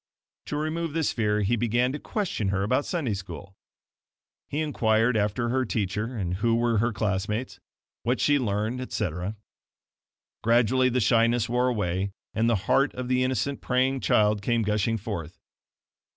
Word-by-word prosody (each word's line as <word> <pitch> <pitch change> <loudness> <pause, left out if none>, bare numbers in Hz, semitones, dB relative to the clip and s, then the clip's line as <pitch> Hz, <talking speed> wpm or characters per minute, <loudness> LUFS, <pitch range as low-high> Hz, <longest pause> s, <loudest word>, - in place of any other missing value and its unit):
To 145 - -2
remove 155 +1 -2
this 160 -2 +1
fear, 105 -2 +1
he 100 +4 +2
began 120 +2 +1
to 145 - -4
question 185 - -2
her 95 0 0
about 130 +7 +1
Sunday 155 - -1
School. 95 -1 -8 1.0
He 145 - -2
inquired 115 -4 +2
after 105 +3 0
her 130 +2 +1
teacher 110 +1 -2
and 90 -3 -2
who 115 +3 +2
were 115 -2 +2
her 120 +3 +1
classmates, 100 +1 -2 0.4
what 125 +4 0
she 145 -1 +3
learned, 110 +2 -1
etc. 95 -4 -3 1.1
Gradually 120 +3 +3
the 125 0 +1
shyness 115 +1 +3
wore 125 +1 +1
away, 100 -5 -1 0.2
and 115 +1 +2
the 115 - +3
heart 135 +6 +2
of 125 0 -4
the 130 0 +2
innocent 130 +2 -1
praying 130 +1 +1
child 105 -3 +2
came 115 +1 +1
gushing 105 +2 0
forth. 95 -7 -6
115 Hz, 155 wpm, -26 LUFS, 105-125 Hz, 1.1 s, she